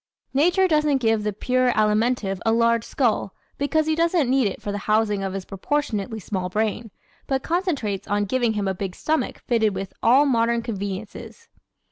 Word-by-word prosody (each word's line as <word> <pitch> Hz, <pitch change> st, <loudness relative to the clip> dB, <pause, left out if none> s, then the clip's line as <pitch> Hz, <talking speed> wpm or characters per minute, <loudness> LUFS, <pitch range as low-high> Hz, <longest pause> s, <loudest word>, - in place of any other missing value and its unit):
Nature 355 Hz, +7 st, +3 dB
doesn't 300 Hz, -4 st, +2 dB
give 225 Hz, -4 st, +1 dB
the 210 Hz, 0 st, -1 dB
pure 255 Hz, +4 st, +1 dB
Alimentive 215 Hz, -2 st, +1 dB
a 225 Hz, -, +2 dB
large 230 Hz, 0 st, +2 dB
skull 230 Hz, -7 st, -1 dB, 0.2 s
because 310 Hz, +2 st, +1 dB
he 315 Hz, -, +1 dB
doesn't 330 Hz, -5 st, +2 dB
need 265 Hz, -4 st, +3 dB
it 195 Hz, -, -5 dB
for 205 Hz, -, -4 dB
the 205 Hz, -, -3 dB
housing 215 Hz, -2 st, +2 dB
of 195 Hz, -1 st, -3 dB
his 195 Hz, -1 st, -5 dB
proportionately 220 Hz, -1 st, -2 dB
small 185 Hz, -2 st, -3 dB
brain, 220 Hz, +3 st, -2 dB, 0.4 s
but 270 Hz, -1 st, -1 dB
concentrates 315 Hz, -, -1 dB
on 205 Hz, 0 st, 0 dB
giving 240 Hz, +1 st, +1 dB
him 205 Hz, -2 st, -2 dB
a 190 Hz, -, 0 dB
big 185 Hz, -1 st, -5 dB
stomach 315 Hz, 0 st, -1 dB
fitted 220 Hz, -4 st, +1 dB
with 195 Hz, 0 st, -5 dB
"all 260 Hz, +5 st, +5 dB
modern 235 Hz, -3 st, +1 dB
conveniences." 205 Hz, -, -6 dB
225 Hz, 175 wpm, -23 LUFS, 205-270 Hz, 0.4 s, all